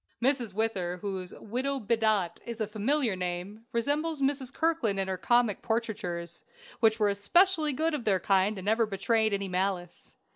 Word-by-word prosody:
Mrs. 245 -5 +1
Whither, 195 -5 -1
whose 190 -1 -5
"Widow 260 +5 -2
Bedott" 215 -5 +1
is 235 0 -6
a 215 - 0
familiar 220 +2 0
name, 185 +5 -5
resembles 290 +6 0
Mrs. 270 -2 0
Kirkland 315 -13 0
in 190 - 0
her 190 - -1
comic 235 +2 +2
portraitures, 205 -7 -3 0.4
which 225 -1 +3
were 210 -1 +3
especially 310 - +3
good 315 +4 0
of 290 -5 -2
their 195 -4 +2
kind, 195 +2 +2
and 190 - -7
never 220 +2 +2
betrayed 220 +2 +1
any 200 -1 -1
malice. 180 -1 -3
220 Hz, 160 wpm, -29 LUFS, 195-245 Hz, 0.4 s, which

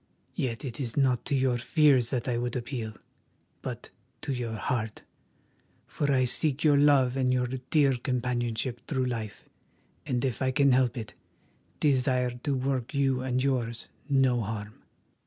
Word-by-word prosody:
Yet 120 0 -3
it 120 -1 -5
is 125 -3 -4
not 130 -3 +2
to 140 - 0
your 130 -2 +1
fears 130 -1 +4
that 125 -1 -2
I 120 -2 0
would 120 +1 -2
appeal, 120 -3 -4 0.7
but - - -6 0.3
to 140 - -2
your 120 -3 -3
heart, 110 0 -3 0.8
for 145 -1 -1
I 130 -2 +3
seek 145 +3 0
your 150 -2 +5
love 140 -3 +4
and 130 -1 +1
your 125 -1 +2 0.2
dear 140 -4 +4
companionship 120 -1 -2
through 130 -4 0
life, 115 -4 -4 0.6
and, 125 0 0
if 130 -4 -2
I 130 - +2
can 140 +1 +3
help 125 0 +2
it, 110 -2 -6 0.7
desire 130 -3 +2
to 125 +3 -2
work 130 0 -2
you 135 -2 +2
and 130 0 0
yours 120 -4 -1 0.2
no 130 -3 +3
harm." 105 0 -6
125 Hz, 155 wpm, -28 LUFS, 120-135 Hz, 0.8 s, your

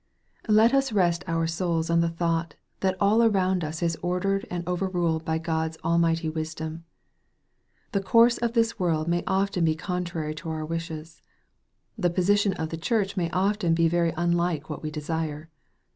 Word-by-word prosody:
Let 220 +3 +5
us 270 -2 +2
rest 180 -4 +2
our 165 -1 0
souls 165 -1 -1
on 170 - +4
the 170 0 +2
thought, 165 -1 -1 0.2
that 190 -1 0
all 210 +3 +4
around 190 -5 +2
us 160 +2 -4
is 165 -2 0
ordered 190 +3 -1
and 175 -1 -4
overruled 175 -3 0
by 160 0 -1
God's 160 -1 -2
almighty 165 -1 +2
wisdom. 160 +1 -5 1.1
The 200 -4 0
course 230 +5 +4
of 235 -1 -1
this 230 -1 +1
world 165 -3 0
may 175 0 +1
often 190 -2 +1
be 160 -1 +2
contrary 175 -3 -3
to 160 +2 -7
our 155 -1 -3
wishes. 165 0 -6 0.8
The 180 -3 +2
position 195 +3 +2
of 160 -4 -4
the 165 - -5
Church 200 -1 0
may 175 -3 0
often 185 -1 +1
be 165 0 +3
very 170 0 +1
unlike 170 -2 0
what 150 - -5
we 155 - -3
desire. 155 0 -4
170 Hz, 170 wpm, -26 LUFS, 160-190 Hz, 1.1 s, Let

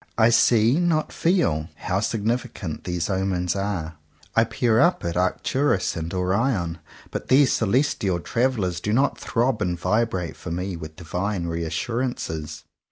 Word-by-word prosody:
"I 110 0 +5
see, 120 +4 +4
not 165 -3 +1
feel," 165 - +1
how 90 +1 -1
signi 110 +2 0
ficant 85 -10 -7
these 90 -2 -1
omens 95 -2 0
are. 95 -6 -3 0.4
I 115 - +5
peer 115 -2 +1
up 170 - +3
at 85 - -2
Arcturus 95 +6 +1
and 80 0 -4
Orion: 95 -2 0 0.3
but - - -5
these 135 0 +5
celestial 110 -5 +1
travellers 110 -5 0
do 105 +4 -2
not 135 +5 +2
throb 120 0 0
and 90 -1 0
vibrate 95 -3 0
for - - -7
me 90 +2 -3
with 80 -2 -8
divine 90 +2 -3
reassurances. 85 - -3
95 Hz, 145 wpm, -24 LUFS, 85-120 Hz, 0.4 s, I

